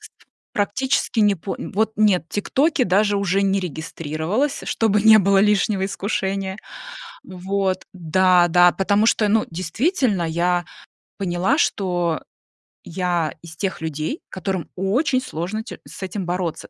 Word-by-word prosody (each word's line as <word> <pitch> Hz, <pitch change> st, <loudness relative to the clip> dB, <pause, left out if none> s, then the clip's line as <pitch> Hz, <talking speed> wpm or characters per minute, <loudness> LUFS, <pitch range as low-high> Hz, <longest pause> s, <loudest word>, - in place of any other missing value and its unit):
с -, -, -13 dB, 0.4 s
практически 235 Hz, +3 st, 0 dB
не 205 Hz, -1 st, +4 dB
по 190 Hz, +3 st, -6 dB
вот, 220 Hz, +2 st, -1 dB
нет, 205 Hz, -6 st, +3 dB
"Тиктоке" 270 Hz, +6 st, +1 dB
даже 205 Hz, +2 st, +2 dB
уже 200 Hz, 0 st, +1 dB
не 195 Hz, 0 st, +1 dB
регистрировалась, 165 Hz, -, -3 dB
чтобы 210 Hz, -2 st, +1 dB
не 220 Hz, 0 st, +8 dB
было 195 Hz, 0 st, +3 dB
лишнего 200 Hz, -1 st, +2 dB
искушения. 195 Hz, -1 st, -2 dB, 0.7 s
Вот, 190 Hz, 0 st, -2 dB
да 180 Hz, +1 st, +3 dB
да, 175 Hz, +1 st, +6 dB
потому 200 Hz, +3 st, +1 dB
что, 220 Hz, -1 st, +3 dB
ну, 220 Hz, +1 st, +2 dB
действительно, 200 Hz, -, 0 dB
я 175 Hz, +2 st, 0 dB, 0.5 s
поняла, 190 Hz, -, 0 dB
что 175 Hz, -, 0 dB, 0.6 s
я 170 Hz, -4 st, -1 dB
из 165 Hz, -1 st, -11 dB
тех 195 Hz, -5 st, -3 dB
людей, 160 Hz, -, -4 dB
которым 185 Hz, -2 st, -4 dB
очень 250 Hz, -, +1 dB
сложно 185 Hz, +3 st, -4 dB
те 235 Hz, -, -10 dB
с -, -, -11 dB
этим 190 Hz, 0 st, -4 dB
бороться, 175 Hz, -2 st, -3 dB
190 Hz, 135 wpm, -21 LUFS, 175-210 Hz, 0.7 s, не